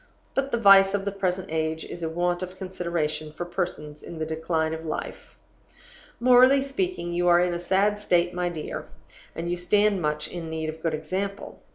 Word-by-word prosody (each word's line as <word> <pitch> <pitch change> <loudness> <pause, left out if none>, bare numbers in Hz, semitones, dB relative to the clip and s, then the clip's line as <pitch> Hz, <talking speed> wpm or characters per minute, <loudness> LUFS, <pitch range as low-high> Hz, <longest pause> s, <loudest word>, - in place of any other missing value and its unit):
But 275 0 -1
the - - +1
vice 195 -2 +7
of 195 -1 -2
the 200 - -1
present 190 -2 -2
age 160 0 -1
is 175 - -7
a 165 - -2
want 175 +2 -1
of 185 0 -6
consideration 170 -5 -3
for 175 +3 -5
persons 170 -4 -4
in 170 - -9
the 160 - -2
decline 160 0 -1
of 160 0 -5
life. 160 - -6 0.8
Morally 255 +2 +6
speaking, 275 - -2
you 175 +1 +1
are 175 0 +6
in 180 0 +1
a 170 - -2
sad 195 +4 +1
state, 175 -3 +2
my 180 0 -1
dear; 160 -3 -6 0.5
and 170 - -4
you 175 +1 -1
stand 205 +2 +2
much 150 -1 -1
in 170 -2 -6
need 160 0 -3
of 160 +1 -7
a - - -22
good 160 -2 0
example. 190 +6 -4
175 Hz, 200 wpm, -26 LUFS, 160-195 Hz, 0.8 s, vice